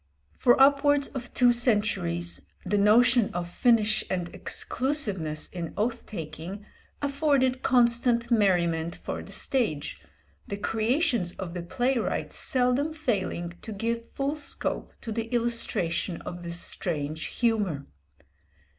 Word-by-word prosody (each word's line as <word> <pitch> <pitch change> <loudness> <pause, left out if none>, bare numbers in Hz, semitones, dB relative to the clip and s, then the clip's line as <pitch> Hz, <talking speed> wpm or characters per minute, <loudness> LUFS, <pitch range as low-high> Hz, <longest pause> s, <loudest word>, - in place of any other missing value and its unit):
For 245 0 +4
upwards 285 +1 +4
of 245 -2 -7
two 245 -1 +4
centuries, 145 - 0 0.2
the 205 +2 +1
notion 230 +2 +5
of 175 -1 -2
finish 215 +2 +2
and 175 -2 -3
exclusiveness 205 - -1
in 170 -3 -6
oath 230 +3 -1
taking 175 +2 -7 0.4
afforded 275 -3 +2
constant 235 -1 +3
merriment 170 -6 +2
for - - -5
the - - -11
stage, 220 - -1 0.5
the 200 - -4
creations 225 - 0
of 180 -3 -6
the 180 - -4
playwright 245 +8 -1
seldom 260 +5 +1
failing 190 - -2
to 220 - -8
give 230 +3 -3
full 280 +2 -2
scope 295 -2 -3
to 225 - -6
the 225 +1 -2
illustration 230 -8 -1
of 175 0 -7
this 170 0 -4
strange 155 -3 -1
humour. 205 - 0
225 Hz, 120 wpm, -27 LUFS, 175-250 Hz, 0.5 s, notion